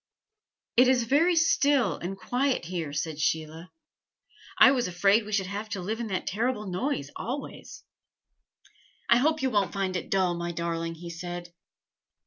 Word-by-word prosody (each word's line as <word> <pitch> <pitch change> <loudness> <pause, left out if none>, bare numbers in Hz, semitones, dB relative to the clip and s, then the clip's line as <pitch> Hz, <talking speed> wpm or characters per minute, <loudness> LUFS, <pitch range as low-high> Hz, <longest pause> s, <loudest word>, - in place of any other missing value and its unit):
"It 250 +1 +7
is 255 -2 +3
very 310 +9 +3
still 280 - +3
and 190 +3 -5
quiet 250 +3 -1
here," 170 -4 -4
said 155 +1 -3
Sheila. 160 +3 -2 0.9
"I - - +8
was 250 -5 0
afraid 195 +5 +3
we - - -7
should 200 -2 +1
have 205 +3 -5
to 205 - -4
live 215 +5 -3
in 235 - -3
that 190 -3 -3
terrible 225 +2 -1
noise 185 - -2
always." 265 +4 -6 1.3
"I 235 - +7
hope 310 +3 +1
you 260 - +1
won't 200 -5 +1
find 195 -2 -2
it 175 - -4
dull, 185 -2 +2
my 170 0 -4
darling," 165 0 -3
he 170 +1 -8
said. 175 0 -7
195 Hz, 160 wpm, -27 LUFS, 170-245 Hz, 1.3 s, I